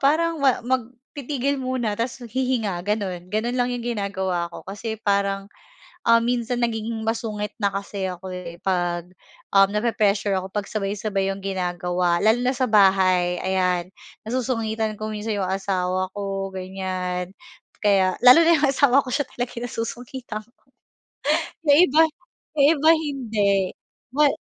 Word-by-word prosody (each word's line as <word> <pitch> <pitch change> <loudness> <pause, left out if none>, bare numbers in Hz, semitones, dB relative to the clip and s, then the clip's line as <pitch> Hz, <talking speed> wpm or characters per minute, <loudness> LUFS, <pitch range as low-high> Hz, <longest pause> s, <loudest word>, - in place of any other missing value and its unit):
parang 320 +3 +2
ma 265 -4 +2
mag 250 -2 0 0.3
titigil 280 0 -1
muna 255 -5 -2
tapos 235 +3 -3
hihinga 240 -5 -1
gano'n, 190 -3 -3
gano'n 235 +4 0
lang 245 0 +1
yung 245 - -3 0.2
ginagawa 190 -4 -2
ko. - - -8
Kasi 220 +2 -5
parang, 200 -1 0 0.6
ah 230 0 +6
minsan 240 0 0
nagiging 225 -1 -1
masungit 220 -2 -2
na 205 - +2
kasi 195 -1 -3
ako 185 +1 -6
eh, 180 -2 -7
'pag 175 -2 -1 0.4
um 195 0 +6
nape-pressure 210 -1 +1
ako 185 - -6
'pag 205 +2 -3
sabay-sabay 200 -1 -1
yung 195 0 -4
ginagawa, 180 -2 0
lalo 220 +3 +4
na 250 +2 0
sa 250 -2 0
bahay, 190 -3 +4
ayan. 180 -1 0 0.3
Nasusungitan 225 -2 -1
ko 215 +1 -5
minsan 215 0 -3
'yong 190 -2 -1
asawa 185 -1 -1
ko 195 -1 -3
ganyan, 185 -1 -4 0.5
kaya, 195 -3 +3
lalo 250 +5 +9
na 335 - +6
'yong 290 -2 +2
asawa 275 0 +4
ko, 255 - -7
siya 285 0 0
talaga 245 0 -4
yung 240 - -4
nasusungitan 235 0 -5
ko, 215 +2 -17 1.2
'yong 290 +1 +7
iba, 305 +4 +4 0.5
'yong 285 -2 +5
iba 310 +3 +5
hindi. 255 -10 -1 0.6
Ma 295 0 +5
210 Hz, 145 wpm, -23 LUFS, 190-245 Hz, 1.2 s, lalo